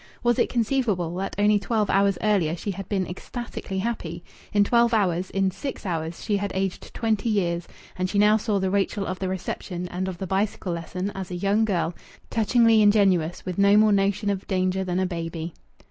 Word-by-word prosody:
Was 240 -1 +2
it - - +3
conceivable 220 -8 0
that 195 +1 -3
only 205 0 +4
twelve 215 0 0
hours 195 -1 +3
earlier 190 -7 +2
she 200 +4 -4
had 195 0 -7
been 195 -3 0
ecstatically 195 +1 -6
happy? 185 -6 -3 0.3
In 205 -1 +4
twelve 235 +2 +3
hours 185 -3 +1
in 195 -1 +1
six 270 +5 -6
hours 165 -2 -3
she 205 - +1
had 200 0 -3
aged 190 -1 -3
twenty 225 -1 0
years, 175 -5 0 0.3
and 185 0 -1
she 205 - -1
now 210 +1 +6
saw 215 -1 0
the 190 -1 0
Rachel 200 +1 0
of 185 0 -4
the 190 - -2
reception 180 -1 -4
and 185 +1 -3
of 185 -2 -4
the 190 - -4
bicycle 195 -1 -1
lesson 180 +4 -4
as 190 -2 -6
a 180 - -4
young 200 +4 +2
girl, 175 -5 0 0.4
touchingly 225 0 +4
ingenuous, 195 -6 +3
with 185 0 -4
no 200 +1 +6
more 215 0 +5
notion 200 +1 +2
of 195 -1 -4
danger 185 0 0
than 180 -1 -1
a 185 - +2
baby. 165 -2 -4
195 Hz, 200 wpm, -25 LUFS, 180-210 Hz, 0.4 s, now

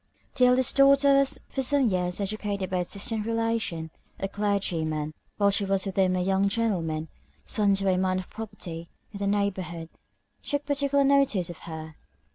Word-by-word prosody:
The 255 - +4
eldest 250 +1 +2
daughter 275 0 +6
was 275 -1 +1
for 270 - -3
some 270 0 +2
years 180 -2 -1
educated 200 -1 -3
by 185 - +1
a 180 - +1
distant 210 +4 -2
relation, 225 -8 -1 0.3
a 195 - -1
Clergyman. 165 -7 -1 0.2
While 200 -1 +4
she 200 - +3
was 195 0 0
with 195 - -4
him 185 -1 +3
a 180 - 0
young 195 +1 +2
gentleman, 170 -8 -1 0.4
son 205 -2 +2
to 195 0 -1
a 185 -1 +3
man 185 0 +1
of 185 - -5
property 170 -6 -7 0.2
in 200 - -8
the 200 - -1
neighbourhood, 185 -5 -2 0.5
took 285 0 -2
particular 280 -1 +1
notice 270 -11 +2
of 170 - -12
her. 160 -1 -8
200 Hz, 175 wpm, -27 LUFS, 180-230 Hz, 0.5 s, daughter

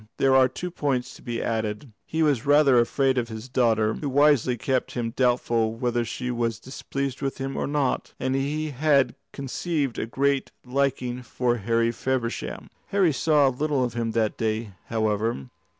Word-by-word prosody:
There 135 -1 +4
are 130 -1 +6
two 175 +8 -6
points 135 -6 -1
to - - -14
be 120 -1 -3
added. 110 +2 -2 0.2
He 160 0 0
was 145 -7 +2
rather 145 -3 +5
afraid 130 +2 +2
of 120 - -2
his 110 +2 -7
daughter, 115 -4 +2
who 145 - -4
wisely 140 -3 +3
kept 130 +2 -1
him 115 -2 -2
doubtful 120 -3 +1
whether 120 0 0
she 125 +2 -4
was 115 -2 -1
displeased 135 0 -4
with 135 -1 -2
him 135 0 -4
or - - -1
not, 145 -2 -1
and 130 0 -1
he 150 +3 -1
had 140 -1 +3 0.2
conceived 140 0 -2
a - - -2
great 140 +3 0
liking 125 -1 -1
for 120 0 -1
Harry 115 +2 +1
Feversham. 125 -1 -3 0.2
Harry 190 -6 +2
saw 150 0 +3
little 140 +1 0
of 120 -2 -2
him 115 -1 -1
that 110 -2 0
day, 110 -1 -1 0.2
however. 110 - -1
125 Hz, 170 wpm, -25 LUFS, 115-140 Hz, 0.2 s, are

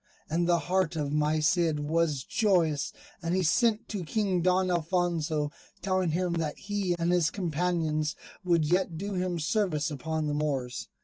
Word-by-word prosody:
And 170 +2 +1
the 175 - +5
heart 180 +1 0
of 145 -3 -2
my 150 +1 +2
Cid 160 -1 +2
was 150 -2 0
joyous, 170 - +1 0.3
and 170 +1 -1
he 185 - +1
sent 225 +6 +2
to 200 -4 -3
King 190 0 0
Don 185 +1 +2
Alfonso, 165 -3 0 0.3
telling 185 -2 +1
him 175 +2 0
that 160 -3 -2
he 200 -3 -1
and 170 +1 +1
his 175 -3 +3
companions 165 -3 -1 0.3
would 170 -3 +2
yet 175 +1 +1
do 200 +4 -4
him 180 -1 -1
service 155 -3 0
upon 155 +2 -2
the 150 - -1
Moors. 140 -4 -2
170 Hz, 165 wpm, -29 LUFS, 155-185 Hz, 0.3 s, the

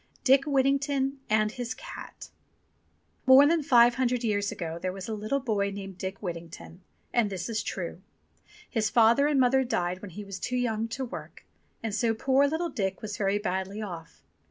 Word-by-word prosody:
DICK 275 +1 +5
WHITTINGTON 275 -1 +1
AND 215 0 +2
HIS 245 +1 -5
CAT - - -10 1.0
MORE 265 +2 +9
than 325 +2 +3
five 240 -3 +6
hundred 250 -1 0
years 205 -2 0
ago 165 -1 -5
there 185 - -1
was 190 0 -7
a - - -4
Httle 220 +6 -2
boy 200 -4 +1
named 195 -2 -8
Dick 190 +2 -5
Whittington, 170 0 -7 0.3
and 235 -4 +2
this 190 -3 -4
is 220 -2 -1
true. 175 -1 -5 0.7
His 220 -3 0
father 235 +5 +5
and 295 -2 +2
mother 265 +1 +4
died 180 -7 -2
when 205 - -8
he 205 +4 -8
was 195 -1 -7
too 250 +6 -2
young 225 -2 0
to 260 +3 -4
work, 245 - -9 0.4
and 225 -2 -2
so 225 +1 +1
poor 265 +4 +3
little 325 +4 -1
Dick 195 -6 -3
was 210 -1 -4
very 200 0 +1
badly 190 0 -3
off. 175 -6 -8
220 Hz, 180 wpm, -28 LUFS, 195-260 Hz, 1.0 s, MORE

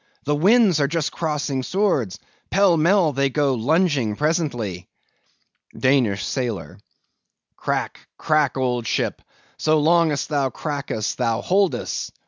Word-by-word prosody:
the 145 - +1
winds 195 +1 +4
are 140 - +2
just 160 0 -2
crossing 150 -4 -2
swords, 150 - 0 0.3
pell 195 -2 +4
mell 165 0 +3
they'll 140 +1 +1
go 140 0 +1
lunging 135 - +1
presently. 120 - -2 0.9
DANISH 125 -7 +1
SAILOR. 120 -6 -4 0.8
Crack, - - -4
crack, 150 -3 +1
old 125 -3 -1
ship! - - -1 0.4
so 155 0 +2
long 165 +1 +3
as 145 - -1
thou 140 -3 0
crackest, 140 -6 -4
thou 115 0 0
holdest! 190 +5 0
145 Hz, 120 wpm, -22 LUFS, 125-165 Hz, 0.9 s, winds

